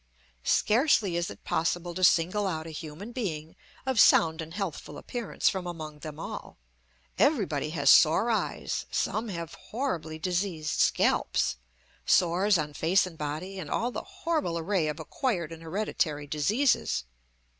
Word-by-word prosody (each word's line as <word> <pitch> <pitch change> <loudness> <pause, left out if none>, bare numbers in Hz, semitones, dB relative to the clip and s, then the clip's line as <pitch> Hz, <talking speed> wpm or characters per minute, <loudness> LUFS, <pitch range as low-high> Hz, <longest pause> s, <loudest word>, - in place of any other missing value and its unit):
Scarcely 220 - +3
is 170 0 -1
it - - -11
possible 175 +1 -1
to 185 +2 -4
single 185 +4 +4
out 160 -3 -3
a 165 - -7
human 160 +8 -8
being 165 -11 -4 0.3
of 265 -4 0
sound 160 -4 +5
and 160 0 -8
healthful 175 -6 -5
appearance 240 -3 -3
from 185 -2 0
among 155 -3 -7
them 155 0 -8
all. - - -7 0.6
Everybody 195 - +2
has 145 -3 +4
sore 170 +9 +5
eyes, 220 - -2
some 225 +2 -1
have 170 -3 -5
horribly 175 - -4
diseased 175 -2 -2
scalps, - - +2 0.5
sores 185 +3 +3
on 150 -2 -3
face 175 +7 +3
and 180 -3 -9
body, 155 +6 -5
and 155 -5 -6
all 240 - 0
the - - -4
horrible 330 - -2
array 170 -1 0
of 150 +1 -3
acquired 175 - -2
and 165 0 -9
hereditary 160 -4 -2
diseases. 155 - +1
170 Hz, 145 wpm, -28 LUFS, 155-205 Hz, 0.6 s, sound